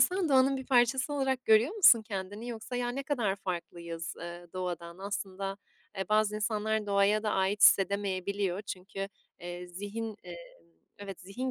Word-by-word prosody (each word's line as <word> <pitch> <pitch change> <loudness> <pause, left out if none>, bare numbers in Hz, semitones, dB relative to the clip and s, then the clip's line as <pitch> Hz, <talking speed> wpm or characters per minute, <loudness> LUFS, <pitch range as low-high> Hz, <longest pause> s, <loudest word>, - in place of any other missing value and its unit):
sen 365 -3 +3
doğanın 270 0 +4
bir 265 - -7
parçası 260 +2 +3
olarak 265 -2 0
görüyor 220 - +5
musun 255 - +7
kendini 205 +2 -5
yoksa, 235 +2 -5
ya, 245 0 -1
ne 270 +3 -3
kadar 235 -9 0
farklıyız, 170 -3 -5
eee, 175 +1 -7
doğadan 175 -1 -5
Aslında, 195 -1 -4 0.4
eee, 190 - -3
bazı 215 0 +3
insanlar 215 0 -1
doğaya 200 +1 +3
da 215 - 0
ait 190 +2 +1
hissedemeyebiliyor 200 0 +3
çünkü, 195 0 -6 0.3
eee, 175 0 -6
zihin, 205 +5 -5
emm 175 -1 -8 0.6
evet 195 -2 -8
zihin 220 +8 -4
205 Hz, 150 wpm, -30 LUFS, 190-235 Hz, 0.6 s, musun